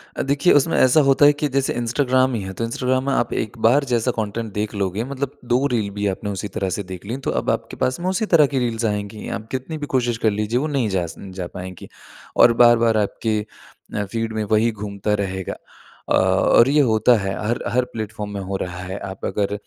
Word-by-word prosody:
अ, - - -2
देखिए, 140 +5 +3
उसमें 145 +3 +3
ऐसा 130 +4 +5
होता 135 +1 +5
है 145 - +7
कि 145 +1 -1
जैसे 135 0 0
इंस्टाग्राम 130 +2 +1
ही 115 - -2
है, 95 0 -6
तो 115 - -4
इंस्टाग्राम 130 +3 0
में 140 - +1
आप 120 - 0
एक 110 +2 -3
बार 140 +5 +4
जैसा 125 -1 +1
कंटेंट 110 +1 -3
देख 105 +1 -3
लोगे 100 +2 -1
मतलब 140 +1 -5 0.2
2 130 +3 +3
रील 110 -4 0
भी 105 0 0
आपने 100 +2 -3
उसी 100 0 -4
तरह 95 -3 -1
से 100 - -3
देख 95 0 -9
ली, 115 +5 -3
तो 135 - -3
अब - - -3
आपके - - -2
पास 130 +2 0
में 180 +2 -1
उसी 190 +4 0
तरह 155 -3 +7
की 135 - +2
रील्स 115 -2 -1
आएँगी। 105 0 -3
आप 110 - -14
कितनी 130 +5 -4
भी 150 - -4
कोशिश 120 -2 +1
कर 110 - +5
लीजिए, 105 +4 -1
वो 150 - -1
नहीं 135 -7 0
जा 95 -3 0
स - - -10 0.2
जा 90 - -3
पाएँगी 90 0 -9 0.5
और 120 - +7
बार-बार 115 -1 +5
आपके 110 +1 0 0.6
अ, 105 - 0
फ़ीड 115 +2 -3
में 110 -1 -1
वही 110 +2 +2
घूमता 105 -1 -3
रहेगा 95 -1 -4 0.6
अ, - - +2
और 95 +6 +4
ये 150 +1 +4
होता 110 +3 +4
है 95 -1 -2
हर 120 +2 0
हर 125 +1 +2
प्लेटफ़ॉर्म 105 -1 -5
में 100 - -4
हो 95 +1 -4
रहा 90 -1 -5
है। 95 +1 -5
आप 95 - -7
अगर 100 -1 -1
115 Hz, 230 wpm, -21 LUFS, 100-130 Hz, 0.6 s, है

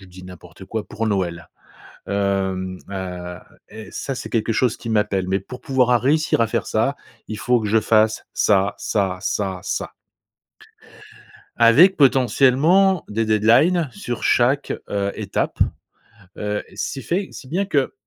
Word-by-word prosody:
je - - -14
dis 90 +1 -13
n'importe 90 0 -12
quoi; 110 +1 -4
«pour 115 +1 -3
Noël. 90 -5 -2 0.6
Hem, 95 -2 -1
heu, 90 -2 -6 0.3
est 110 -1 -10
ça 135 - -4
c'est - - -7
quelque 115 0 0
chose 120 +1 +1
qui 115 - -8
m'appelle, 105 -4 0
mais 95 +1 0
pour 125 +6 -10
pouvoir 130 -2 +1
à 120 - +5
réussir 155 +5 +1
à 115 - +4
faire 110 - -2
ça, 115 +6 0 0.3
il 110 - -5
faut 125 -1 +2
que 105 - -3
je 110 +1 +3
fasse 110 0 +2
ça, 100 0 +2
ça, 95 -3 -1
ça, 95 -1 -2
ça» - - -4 1.7
avec 140 +12 +6
potentiellement 140 +7 +4
des 110 +2 -1
deadlines 120 - +3
sur 120 - -6
chaque, 130 +4 +2 0.2
heu, 100 -1 -1
étape. - - -3 0.8
Heu, 105 0 -2
si 135 - -4
fait 185 +6 -2
si - - -11
bien 180 +8 -1
que, 145 -8 0
110 Hz, 155 wpm, -21 LUFS, 100-130 Hz, 1.7 s, avec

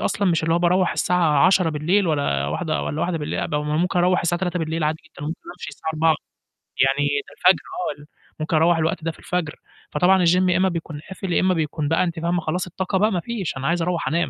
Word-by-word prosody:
أصلًا 200 -1 +1
مش 165 -1 +1
اللي 165 +1 +1
هو 170 - +3
باروّح 180 +1 +2
الساعة 170 -4 +3
22:00 185 -3 +3
بالليل 170 +6 +1
والَّا 140 - 0
01:00 115 - -2
والَّا 150 - -3
01:00 175 -1 -1
بالليل، 150 - -3
قب - - -3
ممكن 155 +5 0
أروّح 180 +1 +3
الساعة 175 0 -1
03:00 180 -1 -1
بالليل 160 0 -2
عادي 155 +1 0
جدًا، 145 - -11
وممكن 160 +3 -5 0.2
أمشي 170 - -7
الساعة 160 - -5
04:00 160 0 +3 0.7
يعني 140 +2 +1 0.2
الفجر 185 +1 +3 0.4
آه - - -13
ال 150 - -15 0.3
ممكن 155 +1 -1
أروّح 165 +2 +4
الوقت 160 0 -1
ده 165 - -1
في - - -19
الفجر، 175 -3 -3 0.4
فطبعا 185 0 +3
الgym 180 +2 +4
يا 175 - +3
إمّا 190 0 +3
بيكون 165 -3 -5
قافل 190 -2 -4
يا - - +3
إمّا 185 0 +3
بيكون 155 -2 -2
بقى 165 +3 +2
أنتِ 170 -2 -3
فاهمة 170 +1 0
خلاص 180 +4 -2
الطاقة 190 +2 -2
بقى 210 +3 +2
ما 180 - 0
فيش، 200 - -4
أنا 135 +1 -3
عايز 170 0 +1
أروّح 175 -2 -1
أنام 165 +5 0
170 Hz, 235 wpm, -22 LUFS, 155-180 Hz, 0.7 s, أروّح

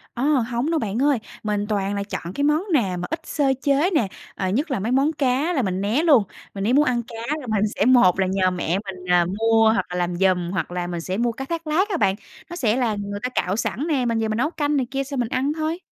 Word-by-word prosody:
Ơ, 240 - -2
hổng 255 -2 +1
đâu 325 - +1
bạn 220 -1 -2
ơi, 285 -1 +3 0.3
mình 210 -1 -1
toàn 200 -1 -1
là 200 - -2
chọn 190 -3 -6
cái 285 - -1
món 300 +4 +2
nào 195 -11 +1
mà 175 - -4
ít 320 - -2
sơ 285 -4 +1
chế 285 +5 +2
nè, 235 -10 +2 0.3
ờ, 190 - -2
nhất 275 - -1
là 260 - 0
mấy 215 +5 -2
món 275 +4 +3
cá 280 +4 +1
là 285 - +1
mình 190 -4 -2
né 220 +10 +1
luôn. 285 -10 +5 0.3
Mà 195 - -6
nếu 215 +5 +1
muốn 295 +3 +5
ăn 245 -4 +1
cá 235 - -10 0.2
thì 280 - -9
mình 210 -2 +2
sẽ 200 - +1
một 240 -8 +5
là 190 - +2
nhờ 185 -1 +1
mẹ 180 0 -1
mình, 185 -2 -8
ờ, 175 -1 +5
mua 225 0 +4
hoặc - - 0
là 180 - -5
làm 175 0 -1
giùm 180 -1 +1
hoặc 180 -3 -2
là 175 0 -3
mình 175 -1 -4
sẽ 185 +3 -3
mua 235 +1 +1
cá 265 +4 -6
thác 330 +2 -4
lác 360 +7 +1
á 380 - 0
bạn, 195 -9 +2 0.3
nó 345 - -6
sẽ 235 -10 +1
là 240 -4 0
người 205 0 -5
ta 250 - 0
cạo 190 -6 -1
sẵn 225 - -2
nè, 280 -6 +1
mình 230 -1 0
về 220 - 0
mình 215 0 -2
nấu 260 +6 +1
canh 295 -3 -1
này 260 - +1
kia 275 0 -1
xong 275 -1 -5
mình 240 -2 -1
ăn 270 +4 0
thôi. 315 +2 -2
235 Hz, 285 wpm, -23 LUFS, 195-285 Hz, 0.3 s, luôn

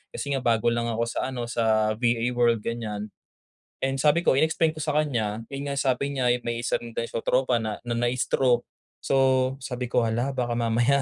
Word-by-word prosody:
kasi 140 - -3
nga 135 - +1
bago 120 -2 +2
lang 120 0 -1
ako 115 0 -1
sa 115 +2 -2
ano, 130 -2 -4
sa 110 -2 +2
VA 120 0 +1
world 120 -3 +2
gan'yan. 105 -3 -4 0.7
And 135 0 -1
sabi 155 +4 +3
ko, - - +5
in-explain 160 +3 +2
ko 155 - -7
sa 150 0 0
kanya, 115 -7 -1
yun 140 +1 -4
nga 140 - -3
sabi 140 +1 0
niya, 125 -2 +3
yung 125 - -4
may 115 - -2
isa - - 0
rin 115 -1 -10
daw 115 - 0
siyang 115 - -4
tropa 125 -1 +1
na 110 -1 -3
na 120 - -2
na-stroke. 120 +1 +1 0.4
So, 130 -1 +2
sabi 125 -2 -5
ko, 120 - +2
"Hala, 120 +4 0
baka 125 -2 -1
mamaya 120 +4 +2
120 Hz, 205 wpm, -26 LUFS, 115-135 Hz, 0.7 s, ko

